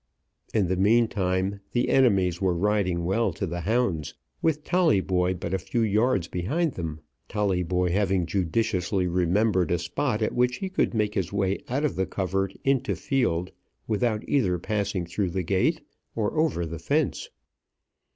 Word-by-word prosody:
In 100 -4 +2
the 95 - 0
mean 115 +5 +4
time 95 0 -1
the 120 - +1
enemies 95 -9 +3
were 95 -2 +2
riding 95 -3 +1
well 100 +6 +1
to 100 - -3
the 85 0 -4
hounds, 100 - 0 0.3
with 155 -2 +1
Tolleyboy 95 - +2
but 85 0 -5
a 95 - +1
few 115 +6 -2
yards 110 -3 +2
behind 140 - -1
them, 80 -3 -5 0.3
Tolleyboy 90 -3 0
having 95 -2 +1
judiciously 95 +1 0
remembered 90 +1 +2
a 85 - +2
spot 105 - -1
at - - -1
which 125 0 +2
he 190 +7 -4
could 185 - 0
make 105 -1 +1
his 95 -4 -2
way 100 -1 0
out 140 +5 0
of 150 - -1
the 95 0 0
covert 95 0 -2
into 135 -2 +1
field 90 -10 0 0.4
without 110 0 0
either 100 -11 +2
passing 100 -1 -2
through 90 +3 -2
the 90 +1 -2
gate 95 +2 +1 0.3
or 105 -2 -1
over 155 - +1
the 85 0 -6
fence. 145 - -1
95 Hz, 160 wpm, -26 LUFS, 90-115 Hz, 0.4 s, mean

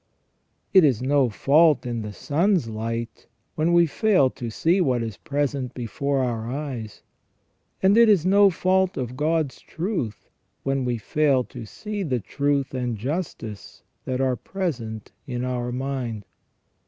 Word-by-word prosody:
It 190 -3 +8
is 130 -5 +3
no 135 -1 +3
fault 150 +7 +4
in 120 -2 -3
the 105 -1 -5
sun's 165 - +1
light 115 +1 -5 0.3
when 160 +2 +1
we 170 0 +6
fail 170 - +3
to 120 -3 -6
see 170 - +2
what 125 -7 +1
is 110 -4 -5
present 140 -3 -2
before 135 +3 -1
our 115 -2 -2
eyes; 130 -6 -5 0.8
and 195 +2 +5
it 230 -1 +7
is 190 -6 +4
no 200 +1 +6
fault 185 +1 +1
of 125 -1 -3
God's 155 0 0
truth 165 - -4 0.4
when 135 -1 0
we 120 -1 0
fail 135 +3 +2
to 120 -2 -9
see 210 - -5
the 135 -9 -1
truth 140 +5 -1
and 125 -3 -2
justice 125 - -5 0.2
that 130 0 -2
are 130 -1 +2
present 120 - -4 0.2
in 125 -1 -3
our 125 -1 -2
mind. 125 -5 -3
135 Hz, 150 wpm, -24 LUFS, 120-165 Hz, 0.8 s, It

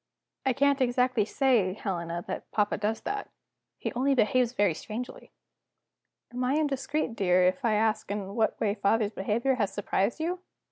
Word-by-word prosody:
"I 260 - +4
can't 280 +1 +2
exactly 250 -3 +2
say, 225 -6 +2
Helena, 175 -4 -4
that - - -6
papa 210 -1 +1
does 215 +2 -1
that. 410 0 -4 0.5
He - - -4
only 270 +3 +2
behaves 245 +1 +3
very 205 -8 +2
strangely." 220 +9 -7 1.0
"Am 250 +1 -2
I 255 +3 +1
indiscreet, 285 -3 -1
dear, 185 -3 +3
if 185 +9 +1
I 225 -3 +2
ask 220 -1 +1
in 200 -1 -4
what 220 0 0
way 205 -2 +1
father's 210 +1 +1
behavior 220 +7 0
has 200 -2 0
surprised 205 +3 -1
you?" 350 +3 -2
225 Hz, 160 wpm, -28 LUFS, 205-260 Hz, 1.0 s, I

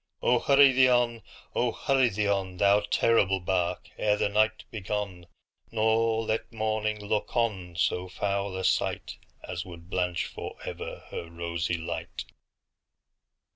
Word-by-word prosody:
Oh! - - +4
hurry 140 -1 +6
thee 130 0 +5
on,—oh! 120 -2 0
hurry 135 -2 +2
thee 105 0 -1
on, 95 -2 -1
Thou 100 +2 +5
terrible 105 -2 +2
bark, 90 -1 -1
ere 105 -1 +2
the 105 - +1
night 110 +2 +2
be 110 - -5
gone, 95 -3 -4 0.4
Nor 110 0 +2
let 110 +1 -2
morning 110 -1 -1
look 105 +2 -1
on 95 -7 -1
so 90 +2 0
foul 100 0 -2
a 95 - -3
sightAs 90 -1 -2
would 85 0 -12
blanch 90 -2 0
forever - - -7
her 85 - -5
rosy 85 +1 -2
light! 80 - -5
105 Hz, 135 wpm, -28 LUFS, 90-110 Hz, 0.4 s, hurry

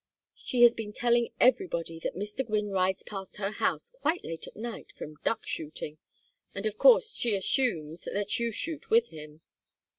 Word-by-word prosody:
She 245 -1 +1
has 240 -1 +9
been 215 -3 -6
telling 240 0 +2
everybody 170 - +2
that - - -4
Mr. 210 +7 -3
Gwynne 210 -3 -1
rides 190 0 +1
past 195 -2 -7
her 200 -1 -2
house 475 - -1
quite 360 -9 -1
late 165 0 -5
at - - -12
night 230 +1 -7
from 150 0 -8
duck 225 - 0
shooting, 155 -1 -5 0.6
and - - -4
of 215 -1 -2
course 485 -2 +6
she 230 -4 +1
assumes 180 - 0
that 205 +4 0
you 235 0 0
shoot 295 +7 -4
with 230 +1 +4
him." 155 0 -11
210 Hz, 175 wpm, -29 LUFS, 185-240 Hz, 0.6 s, has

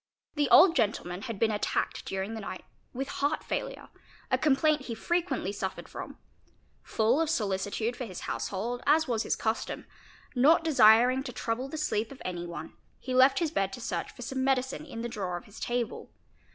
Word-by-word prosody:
The 295 -2 +1
old 340 +1 +8
gentleman 200 -6 0
had 230 -2 -5
been 220 +2 +2
attacked 210 - -1
during 195 +3 -3
the 225 - -5
night 185 -2 -7 0.3
with 270 +2 -4
heart 285 +3 -1
failure, - - -4 0.4
a - - +4
complaint 300 -1 +3
he 230 - -4
frequently 345 - -1
suffered 190 -2 -5
from; - - -8 0.6
full 230 +7 +2
of 325 - 0
solicitude 210 -2 -1
for 250 - -5
his 185 -5 -8
house - - -3
hold, 230 +5 -3
as 315 +2 +4
was 230 -3 0
his - - 0
custom, 220 0 -2 0.5
not 290 +6 +5
desiring 250 -3 +6
to 250 - -4
trouble 240 +3 -3
the 315 - -5
sleep 220 -8 -1
of 270 - -11
any 175 -1 -4
one, 165 -2 -7 0.2
he 255 - -5
left 260 +2 +6
his 330 -4 0
bed 195 -8 0
to 255 - -6
search 230 - -3
for 245 - -10
some 260 +2 -2
medicine 265 +3 0
in 230 -5 -6
the - - -1
drawer 190 -6 -3
of - - -11
his 205 - -13
table. 240 -1 -3
240 Hz, 190 wpm, -29 LUFS, 210-275 Hz, 0.6 s, old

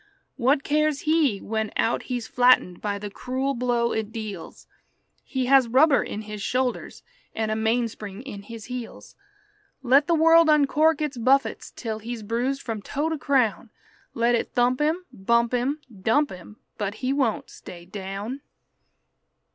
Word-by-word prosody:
What 270 +4 +2
cares 305 -1 +1
he 305 -8 +2
when 220 0 -2
out 230 - +1
he's 245 -3 -3
flattened 245 -8 +3
by 205 -1 -2
the 205 0 -7
cruel 260 +5 -2
blow 240 -1 0
it 220 -1 -3
deals? 215 -6 -7 0.6
He 260 -1 -2
has 265 -1 +5
rubber 275 +5 +4
in 215 - -5
his 210 -1 -7
shoulders 250 +4 -2 0.3
and 220 -1 -1
a - - 0
mainspring 220 -2 -2
in 230 -7 -8
his 220 +1 -10
heels. 250 -2 -8 0.7
Let 275 +3 +4
the 335 - +3
world 330 0 +6
uncork 305 +1 +3
its 290 -4 -3
buffets 265 +4 +1
till 220 -3 -4
he's 230 0 -6
bruised 245 +6 -2
from 225 -3 -4
toe 290 +9 -2
to 320 - -2
crown; 250 -5 +1 0.5
Let 235 +1 +2
it 235 - -1
thump 250 +2 +2
him, 325 +5 0
bump 235 +4 +1
him, 265 +5 0 0.2
dump 285 +9 +2
him, 185 +3 -11 0.2
but 205 0 -2
he 260 - +1
won't 265 -6 -1
stay 175 -1 -11
down. 200 +7 -6
245 Hz, 155 wpm, -25 LUFS, 220-275 Hz, 0.7 s, world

